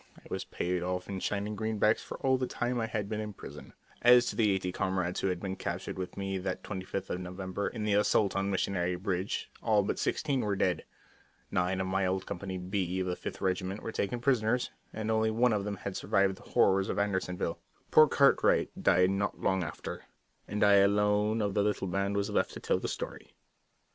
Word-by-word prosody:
I -, -, -19 dB
was -, -, -3 dB
paid 90 Hz, 0 st, -2 dB
off 90 Hz, 0 st, -2 dB
in 95 Hz, -1 st, -4 dB
shining 105 Hz, +2 st, -2 dB
greenbacks 110 Hz, 0 st, +1 dB
for -, -, -7 dB
all 130 Hz, 0 st, +4 dB
the 130 Hz, -, -1 dB
time 120 Hz, 0 st, -1 dB
I 115 Hz, -, -1 dB
had 105 Hz, -2 st, -2 dB
been 105 Hz, +1 st, -3 dB
in 105 Hz, -1 st, -4 dB
prison. -, -, -11 dB, 0.3 s
As 120 Hz, 0 st, +7 dB
to -, -, -9 dB
the 110 Hz, -3 st, +3 dB
eighty 95 Hz, -2 st, 0 dB
comrades 90 Hz, -1 st, -1 dB
who -, -, 0 dB
had 90 Hz, -2 st, -1 dB
been 95 Hz, 0 st, -4 dB
captured 95 Hz, -, -4 dB
with 90 Hz, -, -5 dB
me 95 Hz, -1 st, -2 dB
that 95 Hz, 0 st, -4 dB
25th 95 Hz, -1 st, -5 dB
of 90 Hz, -, -2 dB
November 95 Hz, +2 st, -4 dB
in 110 Hz, -, -4 dB
the 105 Hz, -1 st, +1 dB
assault 105 Hz, 0 st, +3 dB
on 100 Hz, 0 st, 0 dB
Missionary 90 Hz, -2 st, 0 dB
Ridge, 95 Hz, +1 st, -2 dB
all 105 Hz, -3 st, +3 dB
but -, -, -2 dB
sixteen 140 Hz, -4 st, 0 dB
were 105 Hz, -2 st, 0 dB
dead. 90 Hz, -1 st, 0 dB, 0.7 s
Nine 90 Hz, +1 st, +1 dB
of 95 Hz, -, 0 dB
my 95 Hz, 0 st, +1 dB
old 95 Hz, +1 st, -1 dB
Company 95 Hz, +1 st, -5 dB
B 90 Hz, 0 st, -2 dB
of -, -, -1 dB
the 90 Hz, -1 st, -1 dB
Fifth -, -, -7 dB
Regiment 95 Hz, +1 st, -1 dB
were 115 Hz, -, -3 dB
taken 110 Hz, +3 st, -2 dB
prisoners, 120 Hz, -1 st, +1 dB, 0.2 s
and 110 Hz, 0 st, -3 dB
only 110 Hz, 0 st, +2 dB
one 115 Hz, +2 st, +3 dB
of 100 Hz, -1 st, -1 dB
them 105 Hz, -1 st, -2 dB
had 95 Hz, 0 st, -5 dB
survived 100 Hz, -1 st, +1 dB
the -, -, -16 dB
horrors 95 Hz, 0 st, +3 dB
of -, -, -2 dB
Andersonville. 95 Hz, -4 st, -1 dB, 0.3 s
Poor 155 Hz, -, +8 dB
Cartwright 140 Hz, 0 st, +4 dB
died 90 Hz, +1 st, +4 dB
not 100 Hz, +1 st, -1 dB
long 95 Hz, -1 st, +1 dB
after, 75 Hz, -, -6 dB, 0.4 s
and 105 Hz, +1 st, -1 dB
I 100 Hz, -1 st, +7 dB
alone 105 Hz, +2 st, +3 dB
of 100 Hz, -1 st, -1 dB
the 105 Hz, -, +2 dB
little 105 Hz, -2 st, 0 dB
band 100 Hz, +2 st, -1 dB
was 100 Hz, 0 st, -1 dB
left -, -, +1 dB
to -, -, -6 dB
tell -, -, 0 dB
the -, -, -3 dB
story. -, -, -6 dB
100 Hz, 215 wpm, -30 LUFS, 95-105 Hz, 0.7 s, Poor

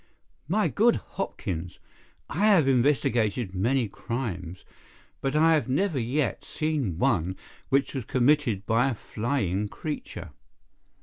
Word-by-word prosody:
"My 205 Hz, +6 st, +2 dB
good 235 Hz, +3 st, +3 dB
Hopkins, 90 Hz, -, -5 dB, 0.5 s
I 205 Hz, +6 st, +1 dB
have 185 Hz, -10 st, +5 dB
investigated 120 Hz, -5 st, +2 dB
many 120 Hz, +6 st, +1 dB
crimes, 95 Hz, -6 st, -5 dB, 0.6 s
but 135 Hz, +1 st, -1 dB
I 160 Hz, +2 st, +5 dB
have 150 Hz, -4 st, +1 dB
never 150 Hz, +2 st, +1 dB
yet 125 Hz, 0 st, -1 dB
seen 150 Hz, -, -2 dB
one 90 Hz, -1 st, +1 dB, 0.3 s
which 135 Hz, 0 st, +2 dB
was 130 Hz, -5 st, -4 dB
committed 125 Hz, -6 st, +2 dB
by 115 Hz, +4 st, +3 dB
a 125 Hz, -, -2 dB
flying 105 Hz, -4 st, -1 dB
creature. 150 Hz, +8 st, -6 dB
125 Hz, 120 wpm, -27 LUFS, 105-150 Hz, 0.6 s, have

